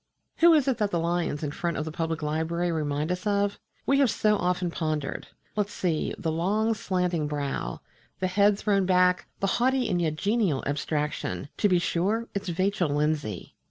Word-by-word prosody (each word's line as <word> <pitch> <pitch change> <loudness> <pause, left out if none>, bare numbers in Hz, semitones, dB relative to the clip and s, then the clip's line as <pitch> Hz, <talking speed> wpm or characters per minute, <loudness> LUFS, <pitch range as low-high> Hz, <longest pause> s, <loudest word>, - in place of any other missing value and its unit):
Who 340 +1 +7
is 290 -3 +2
it 260 -4 +1
that 210 -1 +1
the 175 - 0
lions 170 -2 -1
in 145 - -2
front 170 +1 -2
of 155 - -2
the 160 - -4
Public 160 -1 -2
Library 160 +3 -1
remind 150 0 -1
us 180 +3 -3
of? 200 0 +1 0.3
We 275 0 +3
have 275 -3 +4
so 210 0 +2
often 180 -2 0
pondered. 155 -4 -3 0.3
Let's 205 -1 0
see: 170 -6 -1
the 160 - -2
long 205 +7 +1
slanting 180 -6 -1
brow, 145 -2 -3 0.4
the 185 - 0
head 200 +2 +3
thrown 200 -3 +1
back, 180 0 +3
the - - +2 0.2
haughty 260 0 +2
and 180 -4 0
yet 155 -2 0
genial 200 - +1
abstraction 145 - -2
to 205 - +3
be 180 - +4
sure, 200 +7 0
it's 200 -2 -3
Vachel 185 -1 0
Lindsay! 145 - -1
175 Hz, 185 wpm, -27 LUFS, 155-205 Hz, 0.4 s, Who